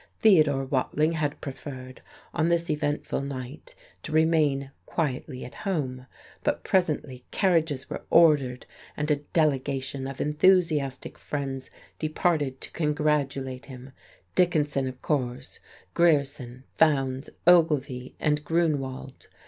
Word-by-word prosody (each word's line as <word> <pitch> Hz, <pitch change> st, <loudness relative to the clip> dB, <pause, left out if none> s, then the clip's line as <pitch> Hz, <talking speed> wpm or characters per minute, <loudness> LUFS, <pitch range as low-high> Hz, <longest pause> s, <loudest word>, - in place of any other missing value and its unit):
Theodore 155 Hz, -10 st, +5 dB
Watling 145 Hz, +3 st, +1 dB
had 150 Hz, -3 st, -2 dB
preferred, 130 Hz, -2 st, -8 dB, 0.3 s
on 165 Hz, 0 st, +1 dB
this 170 Hz, -1 st, +1 dB
eventful 145 Hz, -2 st, -1 dB
night, 135 Hz, 0 st, -7 dB, 0.3 s
to -, -, -7 dB
remain 155 Hz, -4 st, +2 dB, 0.2 s
quietly 135 Hz, -3 st, -3 dB
at 125 Hz, -, -10 dB
home. 135 Hz, -11 st, -3 dB, 0.4 s
But -, -, 0 dB
presently 150 Hz, -8 st, 0 dB
carriages 160 Hz, -8 st, +1 dB
were -, -, -5 dB
ordered, 145 Hz, -7 st, +4 dB, 0.3 s
and 150 Hz, +1 st, -1 dB
a 150 Hz, -, +3 dB
"delegation" 140 Hz, -3 st, -1 dB
of 135 Hz, -1 st, -7 dB
enthusiastic 150 Hz, -3 st, +2 dB
friends 135 Hz, -2 st, -4 dB, 0.3 s
departed 155 Hz, -4 st, 0 dB
to -, -, -9 dB
congratulate 145 Hz, -5 st, -1 dB
him; 130 Hz, 0 st, -10 dB, 0.4 s
Dickinson, 150 Hz, -6 st, +2 dB
of 130 Hz, 0 st, -7 dB
course, 125 Hz, -5 st, -2 dB, 0.3 s
Grierson, 140 Hz, -6 st, +1 dB
Fowndes, 135 Hz, -3 st, +2 dB, 0.2 s
Ogilvy, 150 Hz, -7 st, +3 dB
and 150 Hz, -1 st, +1 dB
Grunewald. 145 Hz, -5 st, -2 dB
145 Hz, 110 wpm, -26 LUFS, 130-155 Hz, 0.4 s, Theodore